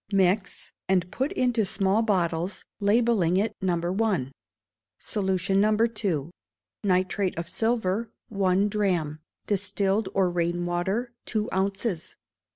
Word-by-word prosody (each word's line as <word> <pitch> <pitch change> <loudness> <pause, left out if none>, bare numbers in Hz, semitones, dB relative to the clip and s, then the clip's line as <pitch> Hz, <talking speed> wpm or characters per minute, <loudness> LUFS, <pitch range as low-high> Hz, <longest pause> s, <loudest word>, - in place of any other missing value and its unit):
Mix, 190 0 +1 0.2
and 180 -1 +2
put 265 +4 -1
into 245 -3 +2
small 195 +2 +1
bottles, 180 -3 0
labelling 205 -4 +3
it 210 +3 0
No. 175 -1 0
i. 180 - 0 0.7
Solution 195 -1 0
No. 215 0 +3 0.3
ii. 165 -5 0 0.5
Nitrate 185 0 +1
of 170 0 -3
silver, 225 +1 0 0.2
one 195 -1 +2
drachm; 180 -8 0 0.3
distilled 200 0 0
or 190 -2 +3
rain 175 0 0
water, 190 +8 -1
two 215 -1 -1
ounces. 190 -1 -1
195 Hz, 115 wpm, -26 LUFS, 180-210 Hz, 0.7 s, labelling